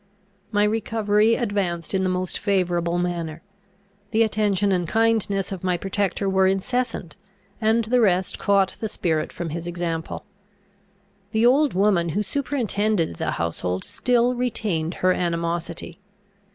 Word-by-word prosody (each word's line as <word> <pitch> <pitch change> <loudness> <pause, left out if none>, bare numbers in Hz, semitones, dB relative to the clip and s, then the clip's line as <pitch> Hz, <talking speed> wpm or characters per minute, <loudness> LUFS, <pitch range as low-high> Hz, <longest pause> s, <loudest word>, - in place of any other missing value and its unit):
My 205 -1 +3
recovery 215 0 +2
advanced 195 -8 -1
in 190 - +2
the 185 - +1
most 185 0 -2
favourable 175 -4 +1
manner. 170 -2 -3 0.7
The 225 +1 +3
attention 205 -2 +1
and 180 -2 +1
kindness 220 -2 +1
of 190 -2 -6
my 180 -1 +1
protector 195 +1 -1
were 190 0 +3
incessant, 195 -2 -1 0.4
and 225 +1 +3
the 245 +2 +2
rest 185 -3 +2
caught 200 -2 +2
the 220 - -2
spirit 160 -7 -1
from 175 -1 -5
his 170 +2 -5
example. 170 -2 -4 1.1
The 220 +1 +3
old 275 0 +4
woman 190 -3 +3
who 205 +6 0
superintended 215 - -1
the - - -1
household 90 +2 -2
still 240 +3 +2
retained 210 -9 -1
her 185 - +5
animosity. 170 0 -3
195 Hz, 135 wpm, -23 LUFS, 175-220 Hz, 1.1 s, her